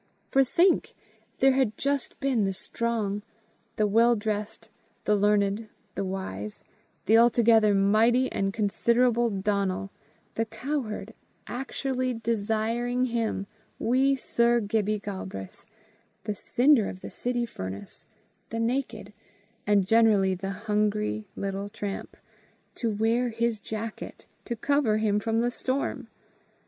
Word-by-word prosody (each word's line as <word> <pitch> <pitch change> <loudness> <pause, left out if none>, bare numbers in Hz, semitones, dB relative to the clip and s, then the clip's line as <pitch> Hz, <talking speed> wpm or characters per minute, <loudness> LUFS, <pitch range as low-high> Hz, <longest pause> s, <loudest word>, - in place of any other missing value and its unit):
For, 270 - +5
think! 350 +8 +2 0.5
there 270 - +6
had 260 -5 +1
just 280 -2 -2
been 265 -6 +1
the 195 - -1
strong, 210 0 -2 0.5
the 215 - +2
well 230 +3 +4
dressed, 210 0 -4 0.3
the 210 - +3
learned, 205 +1 +1 0.2
the 200 - -2
wise, 185 - -5 0.4
the 225 +1 +6
altogether 225 -3 +5
mighty 220 +6 +4
and 195 0 0
considerable 235 +3 +2
Donal, 195 -1 -1 0.4
the 225 - 0
cowherd, 225 -2 -4 0.3
actually 255 0 -2
desiring 230 +2 0
him, 225 -4 -1 0.3
wee 265 +4 +2
Sir 235 -2 +2
Gibbie 215 -1 0
Galbraith, 190 - -7 0.6
the 210 +1 -2
cinder 245 +2 +3
of 185 - -9
the - - -8
city 245 -1 -2
furnace, 95 - -8 0.4
the 225 - -3
naked, 230 -3 -2 0.5
and 205 -2 +4
generally 210 -3 +4
the 190 +1 -4 0.2
hungry 210 0 0
little 195 +1 -3
tramp, 205 -2 -6 0.6
to 230 - -2
wear 225 +3 +1
his 230 -1 -1
jacket 220 +2 -6 0.2
to 235 - -3
cover 255 -2 +2
him 210 -1 +1
from 225 +1 0
the 240 +1 +1
storm! 260 +2 -2
220 Hz, 120 wpm, -27 LUFS, 205-240 Hz, 0.6 s, there